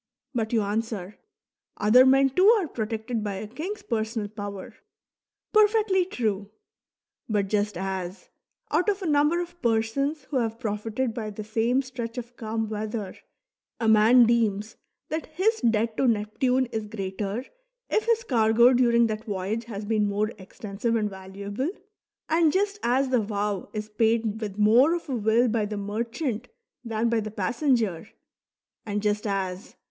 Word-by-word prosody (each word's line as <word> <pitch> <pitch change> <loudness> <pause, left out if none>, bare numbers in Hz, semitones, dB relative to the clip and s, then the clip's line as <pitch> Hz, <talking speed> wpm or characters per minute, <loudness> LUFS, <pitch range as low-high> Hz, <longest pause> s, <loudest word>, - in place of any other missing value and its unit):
But 225 -3 -1
you 225 -3 +2
answer: 210 -2 -3 0.3
" - - -66 0.3
Other 245 +6 +6
men 270 0 +5
too 370 +8 +4
are 360 - -2
protected 225 -1 -3
by 205 -2 -3
a 200 +3 -5
king's 325 - -6
personal 220 -2 -2
power." 205 -2 -7 0.8
Perfectly 425 -3 +4
true. 210 - -2 0.8
But 205 -2 0
just 205 -2 0
as, 190 0 -5 0.4
out 360 - +2
of 400 -1 -1
a - - -3
number 300 +2 +3
of 350 0 -6
persons 240 +6 0
who 275 - +1
have 225 -2 -1
profited 220 +3 -2
by 220 -2 -4
the 210 +1 -7
same 230 +5 +1
stretch 250 -2 -6
of 245 0 -7
calm 225 -1 -3
weather, 215 -2 -4 0.6
a 230 - 0
man 220 +3 +7
deems 220 -2 +1 0.3
that 315 +1 -3
his 385 +8 0
debt 225 -1 +1
to 270 - +2
Neptune 245 +4 +1
is 220 -1 -3
greater 200 +3 -4 0.4
if 435 - 0
his 460 -1 +2
cargo 235 - +4
during 235 -1 +4
that 215 -1 -3
voyage 205 +3 -3
has 210 -3 -6
been 210 -1 +1
more 210 +2 0
extensive 205 +4 -3
and 210 -2 0
valuable, 200 - -5 0.6
and 320 -1 +3
just 400 +3 0
as 260 +3 +2
the 250 -3 +3
vow 205 -2 -2
is 215 -1 -4
paid 220 0 +1
with 205 -2 -5
more 240 +10 +5
of 340 - -6
a 260 - -1
will 225 +2 +3
by 220 -2 0
the 210 0 -4
merchant 230 +4 -3 0.4
than 225 -1 -1
by 230 -1 +2
the 215 0 -4
passenger, 220 - 0 0.7
and 205 -3 -3
just 210 0 0
as. 190 0 -3
225 Hz, 160 wpm, -26 LUFS, 210-255 Hz, 0.8 s, man